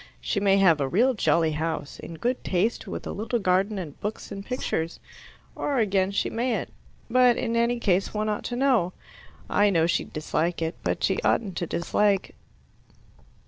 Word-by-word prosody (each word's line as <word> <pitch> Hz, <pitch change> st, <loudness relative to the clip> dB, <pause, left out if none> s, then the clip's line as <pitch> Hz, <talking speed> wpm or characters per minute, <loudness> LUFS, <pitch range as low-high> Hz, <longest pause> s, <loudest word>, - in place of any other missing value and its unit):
She 205 Hz, -, -1 dB
may 195 Hz, -1 st, +4 dB
have 170 Hz, -6 st, +4 dB
a 135 Hz, -, +1 dB
real 240 Hz, -, +3 dB
jolly 165 Hz, -7 st, +2 dB
house, 155 Hz, -1 st, -3 dB
in 165 Hz, -, -8 dB
good 245 Hz, +9 st, -2 dB
taste, 195 Hz, +6 st, 0 dB
with -, -, -6 dB
a -, -, -4 dB
little 220 Hz, +4 st, -2 dB
garden 195 Hz, +1 st, +1 dB
and 160 Hz, -7 st, -7 dB
books, 210 Hz, +2 st, -5 dB
and 195 Hz, 0 st, -6 dB
pictures. 170 Hz, -9 st, -3 dB, 0.6 s
Or, 285 Hz, -2 st, -1 dB
again, 195 Hz, -4 st, +2 dB
she 200 Hz, -, 0 dB
mayn't. 240 Hz, +1 st, -2 dB, 0.3 s
But 250 Hz, 0 st, +4 dB
in 230 Hz, -1 st, -1 dB
any 235 Hz, +1 st, +2 dB
case 195 Hz, -4 st, +1 dB
one 215 Hz, 0 st, -2 dB
ought 210 Hz, -1 st, -2 dB
to 240 Hz, -, -3 dB
know. 245 Hz, -9 st, +2 dB, 0.5 s
I 205 Hz, 0 st, +3 dB
know 165 Hz, -4 st, +3 dB
she'd 170 Hz, -, -1 dB
dislike 160 Hz, +2 st, -1 dB
it, 165 Hz, 0 st, -1 dB
but -, -, -1 dB
she -, -, +1 dB
oughtn't 200 Hz, -6 st, +1 dB
to 175 Hz, -, -2 dB
dislike. 195 Hz, +4 st, +1 dB
200 Hz, 180 wpm, -26 LUFS, 170-230 Hz, 0.6 s, may